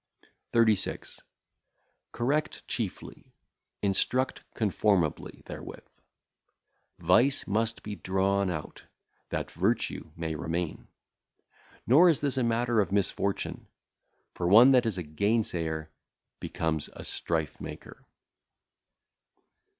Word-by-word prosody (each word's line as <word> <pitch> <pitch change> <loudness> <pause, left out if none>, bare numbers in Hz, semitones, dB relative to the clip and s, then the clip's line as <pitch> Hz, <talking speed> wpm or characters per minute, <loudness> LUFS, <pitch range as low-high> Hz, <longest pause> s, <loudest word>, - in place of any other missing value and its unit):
36. 110 -4 +1 0.9
Correct 145 +6 -1
chiefly; - - -5 0.5
instruct 120 +6 +1
conformably 100 - 0
[therewith]. - - -10 1.0
Vice 135 +3 +3
must 115 +3 -1
be 105 -1 -6
drawn 95 +1 +1
out, 80 -4 -5 0.5
that - - -3
virtue - - -1
may 80 -1 -3
remain. 80 +2 -3 1.0
Nor 160 +9 +7
is 160 - +3
this 140 -2 0
a 130 - +2
matter 115 0 +1
of 95 - -2
misfortune, 100 0 -1 0.7
for 85 - -2
one 115 +8 +8
that 125 -3 +4
is 105 -4 -1
a 90 - -3
gainsayer 80 -3 -1 0.5
becometh 80 -2 -2
a - - -9
strife 80 -3 -2
maker. - - -9
100 Hz, 95 wpm, -28 LUFS, 85-120 Hz, 1.0 s, one